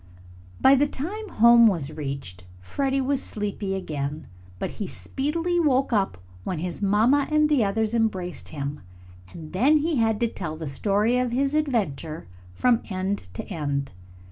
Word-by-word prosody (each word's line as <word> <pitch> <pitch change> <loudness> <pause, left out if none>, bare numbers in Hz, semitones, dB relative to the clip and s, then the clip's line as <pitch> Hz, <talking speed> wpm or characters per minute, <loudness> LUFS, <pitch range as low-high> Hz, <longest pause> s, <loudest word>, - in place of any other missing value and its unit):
By 265 - +6
the 280 +2 +4
time 390 +11 -5
home 235 -2 +7
was 165 -8 0
reached, 135 - -5 0.2
Freddie 270 - -1
was 270 +1 0
sleepy 205 -2 -3
again. 150 -4 -4 0.3
But - - -3
he 205 - -5
speedily 330 - -2
woke 270 -5 +2
up 200 -3 +1 0.3
when 180 - -3
his 175 +4 -4
mamma 225 +8 +3
and 305 0 +4
the 290 -6 +3
others 215 +2 0
embraced 190 -6 -1
him, 145 -1 -5 0.5
and 160 -1 -10
then 270 +11 +4
he 310 0 0
had 225 -2 +2
to 235 - +3
tell 170 -8 -5
the 160 -1 -5
story 210 - +1
of 250 -1 0
his 275 +3 +1
adventure 195 - -1 0.3
from 240 - +3
end 190 - -3
to - - -4
end. 145 -6 -3
215 Hz, 160 wpm, -25 LUFS, 165-270 Hz, 0.5 s, home